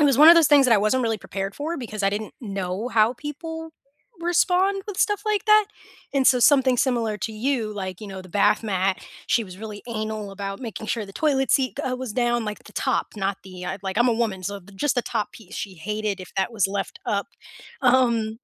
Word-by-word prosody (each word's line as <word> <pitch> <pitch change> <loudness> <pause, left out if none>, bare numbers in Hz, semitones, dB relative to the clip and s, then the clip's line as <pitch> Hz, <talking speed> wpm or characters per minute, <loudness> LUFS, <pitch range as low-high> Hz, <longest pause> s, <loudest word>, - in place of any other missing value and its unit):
it - - +5
was 275 -4 +4
one 305 +2 +10
of 335 - +11
those 335 -3 +5
things 285 -2 +6
that 245 - +4
I - - +5
wasn't 215 +6 +2
really 225 -2 0
prepared 195 0 -5
for 315 +4 -3
because 215 -5 -5
I 195 - +4
didn't 210 +1 -4
know 195 0 -3
how 225 -1 +3
people 320 +4 -6 0.5
respond 365 +3 +2
with 410 -3 -6
stuff 415 +1 +1
like 420 -2 +1
that. 425 -1 +6 0.5
And, 270 -1 +3
so 250 - +6
something 265 0 +5
similar 230 -5 +1
to 220 - -3
you, 225 -1 -1
like, 190 -3 -5
you 215 - -7
know, 190 -1 -7
the 185 - -13
bath 205 +4 +3
mat, 190 -3 0 0.3
she 235 - +2
was 185 -2 -11
really 210 -1 -7
anal 215 -2 -4
about 195 0 -5
making 225 -3 -6
sure 220 0 -1
the 195 - -12
toilet 270 0 +1
seat 265 -2 +2
g 255 - -1
was 255 -3 -5
down 240 -1 +1
at 210 - -5
the - - -14
top, - - 0
not 195 -1 -1
the 180 -1 -9 0.2
like 190 +1 -2
I'm 240 +1 +4
a - - +4
woman, 220 -5 -1
so 200 +2 -4 0.2
just 290 +6 +1
the 245 - +1
top 210 - -3
piece, 210 -3 -13
she 195 -3 -5
hated 210 +3 -3
if 185 - -10
that 195 +4 0
was 205 -5 +2
left 195 0 -4
up. 200 -1 0 0.6
Um. 235 -4 +3
220 Hz, 230 wpm, -24 LUFS, 200-265 Hz, 0.6 s, of